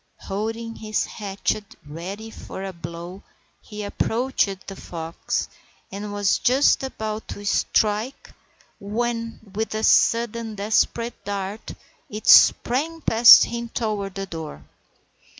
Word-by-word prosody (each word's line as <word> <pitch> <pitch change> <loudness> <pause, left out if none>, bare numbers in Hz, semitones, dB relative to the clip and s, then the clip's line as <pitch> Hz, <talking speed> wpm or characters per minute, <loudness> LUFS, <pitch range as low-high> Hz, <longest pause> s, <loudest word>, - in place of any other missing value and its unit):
Holding 225 +3 -4
his 215 -1 -1
hatchet 205 +1 -4
ready 190 +9 -7
for 190 - -8
a 195 -1 -5
blow 170 +3 -8 0.4
he 210 0 -8
approached 210 -2 -1
the 195 - -8
fox, 165 -2 -4 0.4
and 205 +2 -6
was 205 -1 +1
just 265 +3 +3
about 220 -5 -5
to 205 - -8
strike 215 +5 0 0.5
when, 230 +2 -3
with 220 +1 -3
a 220 - -2
sudden 230 -1 +2
desperate 220 +3 0
dart, 200 +1 -5 0.4
it 215 +1 -7
sprang 315 +7 +5
past 225 -3 +8
him 235 0 -4
toward 210 -4 -3
the 195 0 -4
door. 160 -4 -8
215 Hz, 115 wpm, -23 LUFS, 195-230 Hz, 0.5 s, past